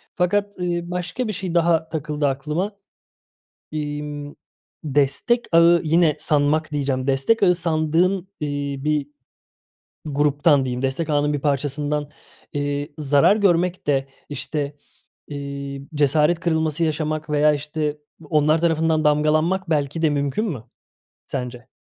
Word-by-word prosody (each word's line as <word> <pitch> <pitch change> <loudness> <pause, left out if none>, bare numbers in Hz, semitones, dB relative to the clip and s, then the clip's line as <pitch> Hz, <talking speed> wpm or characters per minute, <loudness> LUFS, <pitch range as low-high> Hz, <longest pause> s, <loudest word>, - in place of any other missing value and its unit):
Fakat, 200 +3 0
ııı, 175 -1 -2
başka 180 +7 -3
bir 215 - -2
şey 180 -2 -4
daha 165 -1 +2
takıldı 150 -2 -1
aklıma. 150 +9 -2 1.0
İmm, 145 -1 -5 0.5
destek 145 - +1
ağı 170 +1 +6
yine 160 0 +3
"sanmak" 150 +1 +1
diyeceğim, 135 -3 -1
destek 135 +12 +2
ağı 180 -2 +5
sandığın, 170 +3 +1
iii, 145 -2 -3
bir 150 -2 +1 1.0
gruptan 145 -1 +2
diyeyim, 125 0 -3
destek 135 +4 -1
ağının 145 0 +2
bir 145 - -2
parçasından, 145 +1 -1 0.4
iii, 145 +1 -3
zarar 145 +6 +4
görmek 180 -3 +1
de 135 -2 +1 0.2
işte, 145 0 -4 0.5
iii, 140 -1 -6
cesaret 150 +3 +3
kırılması 160 -1 0
yaşamak 155 0 -2
veya 150 0 +4
işte 150 0 -3 0.3
onlar 155 +1 +3
tarafından 160 -1 +2
damgalanmak 155 +5 +2
belki 150 +1 0
de 160 - +4
mümkün 145 +8 -1
mü 145 - -4 0.6
sence? 125 -1 -5
150 Hz, 120 wpm, -22 LUFS, 145-165 Hz, 1.0 s, ağı